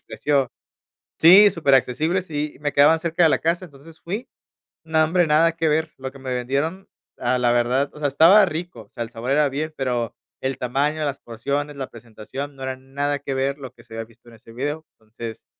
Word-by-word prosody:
precio 140 Hz, -4 st, -1 dB, 0.7 s
sí, 195 Hz, +5 st, +9 dB
superaccesibles 155 Hz, +4 st, +1 dB
y 150 Hz, 0 st, -3 dB
me 145 Hz, 0 st, -2 dB
quedaban 150 Hz, +3 st, +6 dB
cerca 170 Hz, +1 st, -1 dB
de 160 Hz, -, +6 dB
la -, -, +3 dB
casa. 170 Hz, +3 st, 0 dB
Entonces 155 Hz, +1 st, -16 dB
fui 210 Hz, +9 st, -5 dB, 0.6 s
no 160 Hz, -1 st, +3 dB
hombre, 170 Hz, +2 st, +2 dB
nada 160 Hz, +2 st, +4 dB
que 165 Hz, 0 st, -1 dB
ver, 160 Hz, +1 st, +1 dB
lo 130 Hz, 0 st, -6 dB
que -, -, -12 dB
me 130 Hz, -1 st, -4 dB
vendieron, 140 Hz, +10 st, -2 dB, 0.3 s
a 125 Hz, +1 st, 0 dB
la 120 Hz, -1 st, +3 dB
verdad, 125 Hz, +4 st, +1 dB
o 150 Hz, -, -12 dB
sea, 145 Hz, -, +1 dB
estaba 165 Hz, +9 st, +6 dB
rico, 170 Hz, -8 st, -6 dB
o 105 Hz, -, -27 dB
sea, 120 Hz, -, -5 dB
el 115 Hz, -, -8 dB
sabor 120 Hz, +2 st, -4 dB
era 150 Hz, +1 st, +4 dB
bien, 155 Hz, +3 st, -4 dB
pero 125 Hz, -3 st, -2 dB, 0.3 s
el 130 Hz, 0 st, -2 dB
tamaño, 145 Hz, +5 st, -1 dB
las 140 Hz, -1 st, -3 dB
porciones, 140 Hz, +6 st, -4 dB
la 135 Hz, -2 st, -5 dB
presentación 120 Hz, +5 st, -8 dB
no 135 Hz, -, -9 dB
era 130 Hz, 0 st, -3 dB
nada 140 Hz, +2 st, -3 dB
que 140 Hz, -1 st, -4 dB
ver 135 Hz, +1 st, -1 dB
lo 130 Hz, -3 st, -8 dB
que 120 Hz, -, -19 dB
se 110 Hz, -, -15 dB
había 115 Hz, 0 st, -5 dB
visto 115 Hz, +1 st, -21 dB
en 115 Hz, -, -15 dB
ese 115 Hz, +1 st, -17 dB
video, 145 Hz, +6 st, -4 dB
entonces 110 Hz, +1 st, -9 dB
140 Hz, 210 wpm, -22 LUFS, 125-160 Hz, 0.7 s, sí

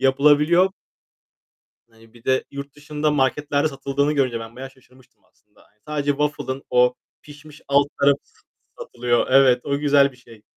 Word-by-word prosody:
yapılabiliyor. 150 Hz, +7 st, +3 dB, 1.2 s
Hani, 115 Hz, 0 st, -22 dB
bir 120 Hz, 0 st, -19 dB
de 130 Hz, 0 st, +1 dB
yurt 140 Hz, 0 st, -8 dB
dışında 150 Hz, +1 st, -2 dB
marketlerde 145 Hz, +1 st, 0 dB
satıldığını 140 Hz, +1 st, -1 dB
görünce 130 Hz, -5 st, 0 dB
ben 115 Hz, +1 st, -11 dB
bayağı 135 Hz, +1 st, -8 dB
şaşırmıştım 130 Hz, -1 st, -25 dB
aslında. -, -, -31 dB
Hani, 105 Hz, -, -34 dB
sadece 145 Hz, -1 st, -2 dB
waffle'ın 145 Hz, -2 st, -2 dB
o 125 Hz, 0 st, +3 dB, 0.3 s
pişmiş 150 Hz, 0 st, -15 dB
alt 140 Hz, 0 st, +3 dB
tarafı 140 Hz, 0 st, +4 dB
s -, -, -30 dB, 0.4 s
satılıyor. 120 Hz, 0 st, -1 dB
Evet. 130 Hz, -2 st, +5 dB
O 140 Hz, 0 st, -1 dB
güzel 140 Hz, -1 st, +3 dB
bir -, -, -20 dB
şey. 115 Hz, -4 st, -18 dB
140 Hz, 155 wpm, -21 LUFS, 125-145 Hz, 1.2 s, Evet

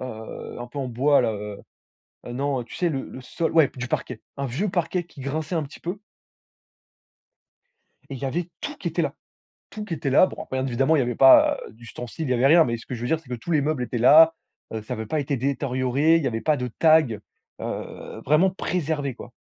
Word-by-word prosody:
heu, 110 Hz, -4 st, -7 dB
un 120 Hz, -, -6 dB
peu 125 Hz, +4 st, -8 dB
en 135 Hz, -, -2 dB
bois 135 Hz, +4 st, +3 dB
là, 115 Hz, -, 0 dB
heu, 105 Hz, -1 st, -6 dB, 0.7 s
heu, 120 Hz, -, -6 dB
non, 135 Hz, +1 st, -1 dB
heu, -, -, -6 dB
tu -, -, -12 dB
sais? 175 Hz, -, 0 dB
Le 135 Hz, -5 st, -2 dB
le 130 Hz, -, -9 dB
sol 165 Hz, +6 st, -3 dB
ouais, 160 Hz, -4 st, +5 dB
du 125 Hz, 0 st, -4 dB
parquet, -, -, -3 dB, 0.2 s
un 140 Hz, 0 st, -2 dB
vieux 150 Hz, -, -2 dB
parquet 180 Hz, 0 st, -1 dB
qui 165 Hz, -4 st, -15 dB
grinçait 150 Hz, +5 st, -3 dB
un 160 Hz, -, 0 dB
petit 140 Hz, -, -12 dB
peu 180 Hz, +4 st, -4 dB, 2.1 s
et 135 Hz, -, -5 dB
il -, -, -8 dB
y 140 Hz, -, -3 dB
avait 170 Hz, +6 st, -2 dB
tout 295 Hz, -, -5 dB
qui -, -, -4 dB
était -, -, -1 dB
là. -, -, -1 dB, 0.6 s
Tout 210 Hz, -1 st, -7 dB
qui 175 Hz, -, -5 dB
était 140 Hz, -, -2 dB
là 145 Hz, +7 st, +6 dB
bon -, -, -7 dB
après, 130 Hz, -, -5 dB
bon, 130 Hz, -, 0 dB
bien -, -, -1 dB
évidemment 135 Hz, +5 st, +2 dB
il -, -, +3 dB
y -, -, +3 dB
avait 120 Hz, -1 st, -1 dB
pas, 135 Hz, +2 st, +7 dB
heu, -, -, -13 dB
d'ustensiles. 120 Hz, +6 st, -7 dB
Il 130 Hz, -, -1 dB
y -, -, +4 dB
avait 125 Hz, +1 st, +2 dB
rien. 165 Hz, +3 st, +7 dB
Mais 120 Hz, -1 st, -2 dB
ce 115 Hz, -, -13 dB
que 125 Hz, -, -5 dB
je 115 Hz, -, -8 dB
veux 120 Hz, -, -2 dB
dire 160 Hz, +4 st, +1 dB
c'est 160 Hz, -, -20 dB
que -, -, -3 dB
tous 120 Hz, +9 st, -7 dB
les 155 Hz, -3 st, +3 dB
meubles 145 Hz, -3 st, -1 dB
étaient 125 Hz, -, -4 dB
là. 160 Hz, +7 st, +7 dB, 0.4 s
Heu, 110 Hz, -, -3 dB
ça 115 Hz, +4 st, -6 dB
avait 110 Hz, -1 st, -5 dB
pas 155 Hz, -, -1 dB
été 140 Hz, 0 st, -1 dB
détérioré. 135 Hz, +3 st, +1 dB
Il 165 Hz, -, -2 dB
y -, -, +1 dB
avait 115 Hz, -2 st, -3 dB
pas 155 Hz, -2 st, +2 dB
de 125 Hz, -1 st, -3 dB
tags, 155 Hz, -3 st, +3 dB, 0.4 s
heu, -, -, -6 dB
vraiment 155 Hz, +7 st, +4 dB
préservé 155 Hz, -8 st, -2 dB
quoi. 120 Hz, -, -11 dB
135 Hz, 255 wpm, -24 LUFS, 125-160 Hz, 2.1 s, pas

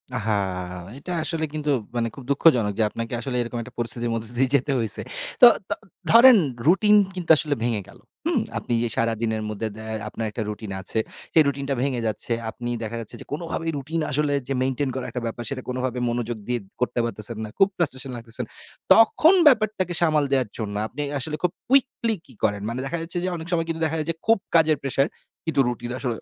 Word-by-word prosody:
আহা! 110 Hz, 0 st, 0 dB, 0.6 s
এটা 180 Hz, +6 st, -7 dB
আসলে 160 Hz, -1 st, -1 dB
কিন্তু 150 Hz, -1 st, -2 dB, 0.3 s
মানে 115 Hz, -1 st, +1 dB
খুব 135 Hz, -, -9 dB
দুঃখজনক 125 Hz, -8 st, +4 dB
যে -, -, +4 dB
আপনাকে 115 Hz, +2 st, -5 dB
আসলে 125 Hz, +1 st, -3 dB
এরকম 120 Hz, 0 st, -4 dB
একটা 120 Hz, 0 st, -12 dB
পরিস্থিতির 120 Hz, 0 st, -1 dB
মধ্য 115 Hz, 0 st, -3 dB
দিয়ে 130 Hz, 0 st, +3 dB
যেতে 140 Hz, +1 st, +1 dB
হইছে। 115 Hz, -, +3 dB, 0.4 s
তো 245 Hz, -, +12 dB, 0.2 s
ত -, -, -8 dB, 0.4 s
ধরেন 235 Hz, 0 st, +9 dB, 0.3 s
রুটিন 210 Hz, +4 st, +5 dB, 0.2 s
কিন্তু 175 Hz, -3 st, -6 dB
আসলে 145 Hz, -2 st, 0 dB
ভেঙে 115 Hz, -4 st, 0 dB
গেল, -, -, -16 dB, 0.3 s
হুম? 330 Hz, -7 st, +2 dB, 0.2 s
আপনি 120 Hz, -, -3 dB
যে -, -, +1 dB
সারাদিনের 115 Hz, -1 st, 0 dB
মধ্যে 110 Hz, +1 st, -3 dB
দ্য 110 Hz, -, -9 dB, 0.3 s
আপনার 110 Hz, +1 st, -4 dB
একটা 115 Hz, -, -4 dB
রুটিন 105 Hz, -1 st, -6 dB
আছে, 110 Hz, -, -2 dB, 0.3 s
সেই 160 Hz, -, +7 dB
রুটিনটা 140 Hz, 0 st, -1 dB
ভেঙে 130 Hz, -3 st, 0 dB
যাচ্ছে, 110 Hz, +2 st, -2 dB, 0.2 s
আপনি 120 Hz, +1 st, -6 dB
দেখা 110 Hz, +1 st, -4 dB
যাচ্ছে 110 Hz, -, -8 dB
যে -, -, -9 dB
কোনভাবেই 165 Hz, +1 st, -3 dB
রুটিন 160 Hz, +4 st, -3 dB
আসলে 145 Hz, 0 st, +1 dB
যে 135 Hz, -, -1 dB
মেইনটেইন 130 Hz, +1 st, 0 dB
করার 130 Hz, -1 st, -3 dB
একটা 125 Hz, -1 st, -4 dB
ব্যাপারে 115 Hz, +1 st, -4 dB
সেটা 130 Hz, -2 st, -5 dB
কোনোভাবেই 125 Hz, -1 st, -2 dB
মনোযোগ 120 Hz, -1 st, -2 dB
দিয়ে 120 Hz, -1 st, 0 dB, 0.2 s
করতে 125 Hz, 0 st, 0 dB
পারতেছেন 110 Hz, -1 st, -3 dB
না, 110 Hz, -, -5 dB
খুব 195 Hz, -, +6 dB
ফ্রাস্ট্রেশন 135 Hz, -5 st, -1 dB
লাগতেছেন, 115 Hz, -1 st, -5 dB, 0.5 s
তখন 310 Hz, +10 st, +6 dB
ব্যাপারটাকে 215 Hz, -, +3 dB
সামাল 155 Hz, -3 st, +3 dB
দেওয়ার 130 Hz, -5 st, +2 dB
জন্য 105 Hz, -3 st, -4 dB
আপনি 145 Hz, +6 st, -6 dB, 0.2 s
আসলে 150 Hz, +4 st, -3 dB
খুব 175 Hz, -, +2 dB, 0.2 s
কুইকলি 250 Hz, -4 st, +2 dB
কি 130 Hz, -, -17 dB
করেন? 100 Hz, -2 st, +1 dB
মানে 120 Hz, +2 st, -3 dB
দেখা 155 Hz, +5 st, -2 dB
যাচ্ছে 165 Hz, +2 st, -4 dB
যে -, -, 0 dB
অনেক 160 Hz, -, -8 dB
সময় 165 Hz, -1 st, +1 dB, 0.2 s
দেখা 160 Hz, +1 st, -1 dB
যায় 155 Hz, -, -3 dB
যে -, -, -7 dB
খুব 225 Hz, 0 st, +5 dB, 0.2 s
কাজের 160 Hz, -2 st, +5 dB
প্রেশার, 135 Hz, +1 st, +1 dB, 0.4 s
কিন্তু 160 Hz, -4 st, 0 dB
রুটিন 120 Hz, 0 st, -3 dB
আসলে 120 Hz, -4 st, -2 dB
130 Hz, 200 wpm, -24 LUFS, 115-160 Hz, 0.6 s, তো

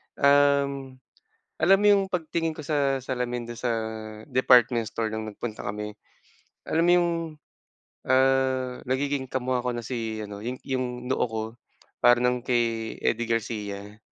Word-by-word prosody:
Um, 140 Hz, -1 st, +3 dB, 0.6 s
alam 190 Hz, +4 st, +5 dB
mo -, -, +4 dB
yung 200 Hz, -1 st, +5 dB
pagtingin 165 Hz, -3 st, -2 dB
ko 155 Hz, -, -8 dB
sa 140 Hz, -3 st, 0 dB
salamin 125 Hz, -2 st, -3 dB
dun 120 Hz, -, -7 dB
sa 125 Hz, -, -1 dB, 0.6 s
department 125 Hz, -2 st, +4 dB
store 115 Hz, 0 st, -2 dB
nung 110 Hz, 0 st, -4 dB
nagpunta 110 Hz, +1 st, -6 dB
kami. 105 Hz, +1 st, -4 dB, 0.8 s
Alam 165 Hz, -, +2 dB
mo 175 Hz, -, +5 dB
yung, 175 Hz, -1 st, +3 dB, 1.0 s
ah, 130 Hz, -1 st, +2 dB
nagiging 135 Hz, +1 st, -1 dB
kamuka 130 Hz, -1 st, -2 dB
ko -, -, +1 dB
na 120 Hz, -, -4 dB
si 115 Hz, -2 st, -4 dB
ano, 105 Hz, 0 st, -7 dB
yung 125 Hz, +1 st, -4 dB
yung 130 Hz, -1 st, -2 dB, 0.2 s
noo 130 Hz, -, +2 dB
ko, 110 Hz, -2 st, -3 dB, 0.6 s
para 120 Hz, 0 st, +6 dB
ng 125 Hz, 0 st, +1 dB
kay 115 Hz, -2 st, 0 dB
Eddie 120 Hz, +1 st, +1 dB
Garcia 105 Hz, -2 st, -3 dB
125 Hz, 145 wpm, -26 LUFS, 115-135 Hz, 1.0 s, para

